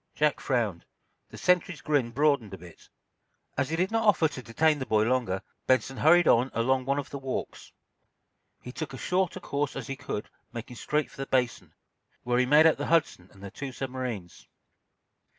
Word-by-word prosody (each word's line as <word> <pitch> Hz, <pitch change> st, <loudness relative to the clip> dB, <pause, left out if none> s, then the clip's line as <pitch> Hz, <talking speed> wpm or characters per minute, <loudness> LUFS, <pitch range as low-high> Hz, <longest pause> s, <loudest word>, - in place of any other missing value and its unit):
Jack 150 Hz, -1 st, +2 dB
frowned. 115 Hz, -10 st, -1 dB, 0.5 s
The -, -, -11 dB
sentry's 180 Hz, -3 st, +1 dB
grin 145 Hz, -5 st, +1 dB
broadened 125 Hz, -6 st, +1 dB
a -, -, -12 dB
bit. 85 Hz, -1 st, -15 dB, 0.7 s
As 130 Hz, -, 0 dB
he 165 Hz, -, -1 dB
did 185 Hz, +4 st, 0 dB
not 225 Hz, 0 st, +1 dB
offer 175 Hz, -6 st, +5 dB
to 140 Hz, -4 st, -8 dB
detain 150 Hz, +6 st, +1 dB
the 130 Hz, -, -3 dB
boy 110 Hz, -1 st, +3 dB
longer, 115 Hz, -6 st, 0 dB, 0.2 s
Benson 130 Hz, +1 st, +2 dB
hurried 175 Hz, +2 st, +5 dB
on 125 Hz, +3 st, +4 dB
along 130 Hz, +2 st, +1 dB
one 140 Hz, +1 st, 0 dB
of 145 Hz, -, -4 dB
the 140 Hz, -, -5 dB
walks. 135 Hz, -1 st, -5 dB, 0.9 s
He 125 Hz, -, -7 dB
took 145 Hz, 0 st, -6 dB
as -, -, -9 dB
short 185 Hz, -1 st, 0 dB
a -, -, -5 dB
course 145 Hz, 0 st, -2 dB
as -, -, -5 dB
he 135 Hz, -, -5 dB
could 105 Hz, -, -5 dB, 0.2 s
making 120 Hz, +1 st, -8 dB
straight 150 Hz, +6 st, -1 dB
for 170 Hz, -, -17 dB
the 135 Hz, 0 st, -4 dB
Basin, 125 Hz, -3 st, -1 dB, 0.5 s
where 120 Hz, 0 st, +1 dB
he 125 Hz, -, +2 dB
made 150 Hz, +4 st, +6 dB
out 160 Hz, -, +5 dB
the -, -, -3 dB
"Hudson" 160 Hz, -, +1 dB
and 100 Hz, -1 st, -16 dB
the 100 Hz, -, -7 dB
two 140 Hz, +4 st, -6 dB
submarines. 125 Hz, -9 st, -6 dB
130 Hz, 195 wpm, -28 LUFS, 120-150 Hz, 0.9 s, made